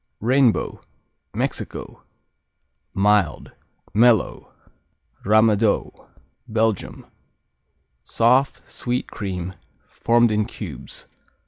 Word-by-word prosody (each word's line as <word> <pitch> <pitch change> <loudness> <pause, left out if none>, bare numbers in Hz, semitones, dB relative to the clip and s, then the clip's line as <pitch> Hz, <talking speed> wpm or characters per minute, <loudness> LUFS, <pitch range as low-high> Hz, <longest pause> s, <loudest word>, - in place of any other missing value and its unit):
Rainbow 125 +1 +2 0.5
Mexico - - -4 0.9
Mild; 100 -5 +1 0.4
mellow. 115 -1 +3 0.7
Ramadoux 110 0 +3 0.6
Belgium 110 -2 -1 1.0
Soft; 130 +4 +2
sweet 125 +1 -3
cream; 95 -3 -4 0.4
formed 120 -1 +2
in 105 0 +1
cubes. 95 - -8
110 Hz, 65 wpm, -22 LUFS, 100-120 Hz, 1.0 s, mellow